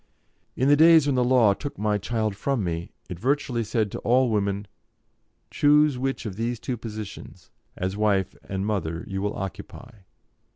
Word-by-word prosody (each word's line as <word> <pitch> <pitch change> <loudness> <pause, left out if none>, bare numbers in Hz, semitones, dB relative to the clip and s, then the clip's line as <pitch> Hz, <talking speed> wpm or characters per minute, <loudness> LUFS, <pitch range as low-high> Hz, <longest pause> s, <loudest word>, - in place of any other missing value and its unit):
In 130 - +1
the 145 - +6
days 160 0 +7
when 145 - +1
the 125 -1 +2
law 120 -5 +4
took 145 +7 -7
my 105 0 0
child 110 0 -2
from 130 +2 -1
me, 85 +1 -3 0.2
it 90 -2 -7
virtually 130 -1 0
said 110 -1 -1
to - - -5
all 125 0 +2
women: 100 -1 -1 0.9
"Choose 150 -1 +4
which 135 -1 -2
of 100 -3 -5
these 115 +1 -2
two 125 - -3
positions, 110 -3 -9 0.3
as 95 +1 -2
wife 100 -3 +1
and 95 0 -2
mother, 85 -6 -2
you 95 0 -4
will 105 +1 -2
occupy. 100 +5 -7
110 Hz, 170 wpm, -25 LUFS, 100-130 Hz, 0.9 s, days